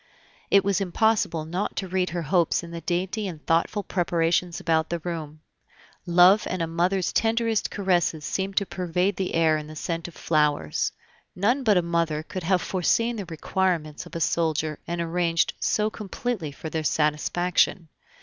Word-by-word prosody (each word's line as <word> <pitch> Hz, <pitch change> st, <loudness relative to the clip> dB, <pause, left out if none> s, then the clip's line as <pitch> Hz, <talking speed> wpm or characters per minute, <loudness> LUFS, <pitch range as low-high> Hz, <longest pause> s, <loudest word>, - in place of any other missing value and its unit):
It 200 Hz, -, +5 dB
was 200 Hz, -1 st, +1 dB
impossible 195 Hz, -4 st, +1 dB
not 180 Hz, +5 st, -3 dB
to 190 Hz, -, -3 dB
read 185 Hz, 0 st, 0 dB
her 175 Hz, 0 st, -3 dB
hopes 170 Hz, +2 st, +2 dB
in 170 Hz, -, -9 dB
the 170 Hz, 0 st, -6 dB
dainty 185 Hz, +5 st, -2 dB
and 160 Hz, -5 st, -8 dB
thoughtful 170 Hz, +5 st, +1 dB
preparations 170 Hz, -1 st, 0 dB
about 160 Hz, -1 st, +1 dB
the 170 Hz, -, -1 dB
room; 155 Hz, -2 st, -6 dB, 0.7 s
love 180 Hz, +4 st, +6 dB
and 185 Hz, -, -2 dB
a 165 Hz, -, +1 dB
mother's 175 Hz, +3 st, 0 dB
tenderest 225 Hz, -1 st, +1 dB
caresses 175 Hz, -6 st, 0 dB
seemed 195 Hz, 0 st, -3 dB
to 200 Hz, -, +3 dB
pervade 180 Hz, +1 st, -1 dB
the 190 Hz, -2 st, -2 dB
air 160 Hz, -1 st, +3 dB
in 150 Hz, -, -8 dB
the 155 Hz, -, -10 dB
scent 165 Hz, +2 st, -3 dB
of 175 Hz, -, -12 dB
flowers. 150 Hz, -, +1 dB, 0.4 s
None 230 Hz, +9 st, +2 dB
but 210 Hz, -5 st, +4 dB
a 180 Hz, -, +3 dB
mother 165 Hz, -2 st, 0 dB
could 185 Hz, +3 st, -6 dB
have 180 Hz, +2 st, +1 dB
foreseen 230 Hz, +6 st, +1 dB
the 200 Hz, -, -4 dB
requirements 165 Hz, -2 st, -2 dB
of -, -, -13 dB
a -, -, -2 dB
soldier 155 Hz, -2 st, 0 dB
and 170 Hz, 0 st, -2 dB
arranged 170 Hz, 0 st, +1 dB
so 215 Hz, 0 st, +1 dB
completely 210 Hz, -5 st, -4 dB
for 155 Hz, +3 st, -8 dB
their 160 Hz, -1 st, -2 dB
satisfaction. 160 Hz, +4 st, +1 dB
175 Hz, 170 wpm, -25 LUFS, 160-190 Hz, 0.7 s, love